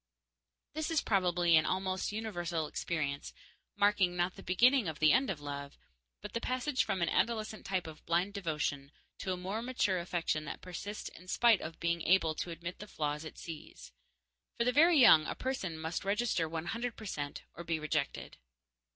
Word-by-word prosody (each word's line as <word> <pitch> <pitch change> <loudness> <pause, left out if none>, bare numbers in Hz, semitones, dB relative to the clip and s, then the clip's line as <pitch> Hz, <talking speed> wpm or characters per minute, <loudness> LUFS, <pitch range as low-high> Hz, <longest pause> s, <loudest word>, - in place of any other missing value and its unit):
This 315 +1 -2
is 325 -2 +2
probably 180 -4 +3
an 155 - +3
almost 185 +1 -1
universal 175 -7 -2
experience, 150 -3 -3 0.4
marking, 205 -3 +3
not 175 +1 0
the - - -10
beginning 240 +5 +4
of 160 -2 -3
the 155 0 +5
end 265 +2 +3
of 180 -6 -2
love, 140 -1 -6 0.5
but 210 - -7
the 230 - -2
passage 255 +2 0
from 190 -4 -1
an 170 - +1
adolescent 215 +1 -1
type 185 -2 -1
of 160 -1 -10
blind 175 +4 +1
devotion 150 -7 -2 0.3
to 190 - -2
a 180 - -1
more 195 +5 -3
mature 230 -7 0
affection 170 -3 -1
that 140 - -6
persists 200 +3 -6
in 180 - -15
spite 230 +1 +4
of 160 +1 -7
being 170 0 0
able 165 -2 +3
to 175 - -4
admit 170 +1 -6
the 210 - -8
flaws 150 -4 -2
it 155 - -9
sees. 165 -3 -9 0.7
For - - +2
the 250 - +3
very 325 +5 +6
young 195 - +8
a - - -3
person 225 -11 -3
must 160 +4 -3
register 200 -5 0
one 160 0 -4
hundred 235 +3 -3
percent 150 -9 -5
or 170 - -8
be 165 -1 -1
rejected. 155 -2 -2
180 Hz, 185 wpm, -33 LUFS, 160-215 Hz, 0.7 s, young